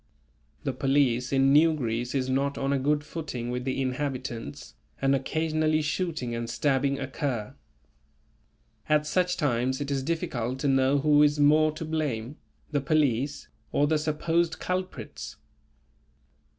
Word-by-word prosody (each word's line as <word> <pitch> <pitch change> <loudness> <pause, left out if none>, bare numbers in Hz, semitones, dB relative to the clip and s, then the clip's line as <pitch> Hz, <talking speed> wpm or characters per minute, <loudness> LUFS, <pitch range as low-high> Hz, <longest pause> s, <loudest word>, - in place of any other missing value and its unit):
The 135 - -1
police 130 -2 +1
in 135 0 +4
New 160 +2 +5
Greece 120 -1 -2
is 130 -1 0
not 140 +2 0
on 135 +1 0
a 140 - +1
good 145 +2 +1
footing 145 -6 -5
with 125 0 -3
the 130 0 -1
inhabitants, 130 -2 -4 0.3
and 135 0 +2
occasionally 155 +2 +1
shooting 155 -6 -2
and 115 0 -3
stabbing 135 +3 +1
occur. 130 -5 -3 1.4
At 150 0 +3
such 180 +3 +1
times 130 -2 0
it 145 0 -3
is 135 -1 0
difficult 130 -5 -2
to 145 - +1
know 135 +1 +3
who 145 +1 +4
is 150 0 +4
more 155 +2 +5
to 160 - -6
blame; 150 -5 -2 0.3
the 145 -2 +1
police 140 -2 0 0.2
or 145 - +3
the 155 +1 +2
supposed 160 +2 0
culprits. 185 0 -4
140 Hz, 140 wpm, -27 LUFS, 130-155 Hz, 1.4 s, New